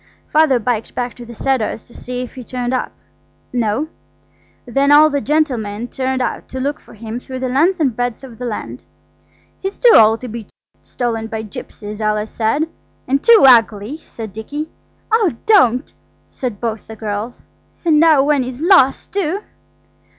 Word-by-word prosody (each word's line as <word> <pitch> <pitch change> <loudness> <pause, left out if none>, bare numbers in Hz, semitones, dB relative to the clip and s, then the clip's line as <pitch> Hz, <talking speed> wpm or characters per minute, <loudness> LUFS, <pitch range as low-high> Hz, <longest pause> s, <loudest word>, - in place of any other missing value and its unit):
Father 305 -4 +4
biked 230 -1 -2
back 245 -1 -2
to 240 -1 -11
the 235 - -10
Cedars 240 -4 -1
to 240 - -17
see 250 0 -5
if 250 - -9
he'd 255 -3 -10
turned 250 0 -3
up. 255 - -1 0.6
No. 240 +4 0 0.8
Then 275 +3 +2
all 305 +1 +7
the 285 -1 0
gentlemen 245 -8 -1
turned 260 -1 -1
out - - -4
to 260 - -6
look 285 +3 -2
for - - -17
him 225 +2 -6
through 260 +1 -8
the 255 0 -2
length 325 +9 +2
and 270 -7 +1
breadth 245 +1 -2
of 240 -4 -11
the 250 - -4
land. 125 - -5 0.8
"He's 385 +1 -4
too 480 -2 +6
old 220 +1 +6
to 255 - -6
be 225 -2 -7 0.3
stolen 225 -2 -3
by 220 0 -4
gipsies," 210 0 -8
Alice 215 0 -1
said. 240 +8 0 0.4
"And 275 +2 +1
too 465 -2 +7
ugly," 225 +1 +4
said 225 -9 -9
Dicky. 290 +9 -5 0.4
"Oh 435 -7 +3
don't!" 255 - +4 0.3
said 240 -6 -5
both 225 -2 -4
the 220 - -8
girls; 215 +2 -5 0.4
"and 310 -3 +4
now 315 -4 +6
when 290 -1 +2
he's 255 0 -5
lost, 330 -5 +4
too!" 395 +1 -1
250 Hz, 170 wpm, -18 LUFS, 225-290 Hz, 0.8 s, all